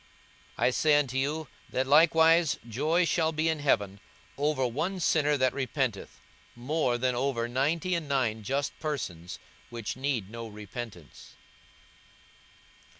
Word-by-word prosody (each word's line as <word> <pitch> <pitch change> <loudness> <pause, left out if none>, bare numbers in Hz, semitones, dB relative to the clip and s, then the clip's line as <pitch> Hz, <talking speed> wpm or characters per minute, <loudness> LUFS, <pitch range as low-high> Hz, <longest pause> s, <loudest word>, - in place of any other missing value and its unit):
42:015:007 - - +1
I - - +5
say 150 +3 +3
unto 135 -3 -1
you, 150 +3 -2 0.2
that 130 - 0
likewise 160 +2 +5
joy 155 +10 +1
shall 160 -1 +1
be 160 +1 0
in 160 -1 -1
heaven 100 -9 +1 0.4
over 145 -2 0
one 160 +11 -2
sinner 150 -3 +2
that 130 -1 +2
repenteth, 130 -5 -3 0.4
more 125 0 0
than 125 +1 0
over 120 -2 -1
ninety 150 +8 0
and 165 -4 -2
nine 125 -6 0
just 135 +6 -2
persons, 90 - -4 0.3
which 115 -2 -5
need 130 -6 -2
no 115 0 -6
repentance. 105 - -9
135 Hz, 135 wpm, -28 LUFS, 120-155 Hz, 0.4 s, I